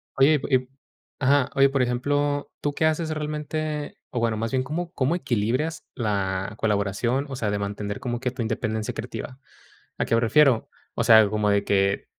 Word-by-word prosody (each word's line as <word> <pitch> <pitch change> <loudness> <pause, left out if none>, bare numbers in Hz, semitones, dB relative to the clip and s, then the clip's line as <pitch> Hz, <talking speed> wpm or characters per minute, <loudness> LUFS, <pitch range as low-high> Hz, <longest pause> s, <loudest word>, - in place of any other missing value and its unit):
Oye, 140 +3 +5
y - - 0
p - - -5
y - - +5
p 125 0 -14 0.5
ajá, 140 -1 +3
oye, 135 0 +5
por 135 -1 0
ejemplo, 145 +4 0
¿tú 145 -1 -1
qué 160 - 0
haces 160 +1 +1
realmente? 150 0 -3
O 125 - -2
bueno, 115 -2 0
más 115 +1 -2
bien, 130 -1 +1
¿cómo 165 +6 -4
cómo 135 +5 +1
equilibras 130 - -1
la 100 -3 -1
colaboración, 110 +6 0
o 135 - -5
sea, 110 -5 -1
de 105 - -1
mantener 100 0 -4
como 120 -1 -3
que 125 0 -2
tu 125 - -5
independencia 110 -1 -2
creativa? 125 +2 -6 0.6
¿A - - +1
qué - - 0
me 115 - +4
refiero? 130 +1 +4 0.3
O - - 0
sea, 110 -2 +7
como 105 0 +1
de 100 0 +2
que 100 0 +1
125 Hz, 195 wpm, -25 LUFS, 110-145 Hz, 0.6 s, sea